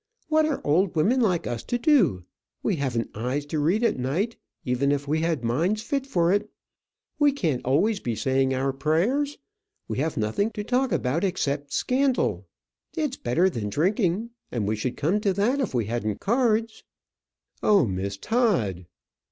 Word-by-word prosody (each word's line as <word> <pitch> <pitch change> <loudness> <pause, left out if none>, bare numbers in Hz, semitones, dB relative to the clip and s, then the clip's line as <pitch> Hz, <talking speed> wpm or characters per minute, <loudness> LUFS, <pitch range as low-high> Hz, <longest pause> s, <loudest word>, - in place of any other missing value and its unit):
What 310 0 +3
are 300 - -1
old 170 +5 +2
women 210 +12 +3
like 185 -7 +1
us 120 -2 -3
to 245 - -1
do? 225 - +3 0.4
We 195 - 0
haven't 125 -5 -2
eyes 125 +6 -2
to 150 +1 -2
read 180 +10 +2
at 230 - +1
night, 170 - -1 0.3
even 130 +3 +1
if 145 0 -1
we 155 +2 +1
had 165 -6 -1
minds 170 - 0
fit 275 -1 -2
for 175 -6 +2
it. 205 +1 0 0.7
We 290 -1 +5
can't 165 - -1
always 195 - +2
be 120 -8 -3
saying 135 +2 +1
our 135 +1 0
prayers. 195 - 0 0.5
We - - -3
have 160 +3 -1
nothing 110 - 0
to 210 -1 -4
talk 250 +4 +1
about 140 +8 0
except 145 -7 -1
scandal. 255 - 0 0.5
It's 300 -5 -1
better 165 - +1
than 115 - -2
drinking; 190 - 0 0.2
and 110 -5 -2
we 110 - +1
should 120 +4 -3
come 170 +9 +1
to 200 -3 +1
that 230 +9 +1
if 260 - -2
we 115 -3 +1
hadn't 110 -2 -2
cards." 225 -1 +1 0.8
"Oh, 200 -8 +4
Miss 100 0 -3
Todd!" 120 - 0
165 Hz, 170 wpm, -25 LUFS, -, 0.8 s, We